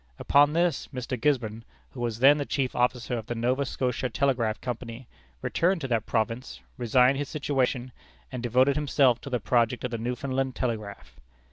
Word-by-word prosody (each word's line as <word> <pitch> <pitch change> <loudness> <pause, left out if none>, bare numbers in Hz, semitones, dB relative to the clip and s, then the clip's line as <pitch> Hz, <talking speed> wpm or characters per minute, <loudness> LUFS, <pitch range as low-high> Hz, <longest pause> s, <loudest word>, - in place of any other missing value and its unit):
Upon 145 +2 +4
this, 170 -3 +1
Mr. 130 -1 -4
Gisborne, 115 -4 0 0.3
who 130 - -10
was 115 -2 -2
then 140 +5 +6
the - - 0
chief 135 -3 -1
officer 125 -1 0
of 110 - -10
the 120 - -3
Nova 125 +4 0
Scotia 125 0 -2
Telegraph 120 -4 0
Company, 120 0 -6 0.4
returned 180 +2 +1
to 135 - -3
that 115 -3 0
province, 115 +2 -2 0.2
resigned 125 +3 +3
his 145 - -3
situation, 130 -4 -1 0.4
and 125 -2 -5
devoted 130 +3 +3
himself 140 -4 +2
to 140 - -7
the 125 -2 -1
project 120 +2 +1
of 125 - -3
the 115 - -3
Newfoundland 130 +2 -2
telegraph. 100 - -5
125 Hz, 170 wpm, -27 LUFS, 115-135 Hz, 0.4 s, then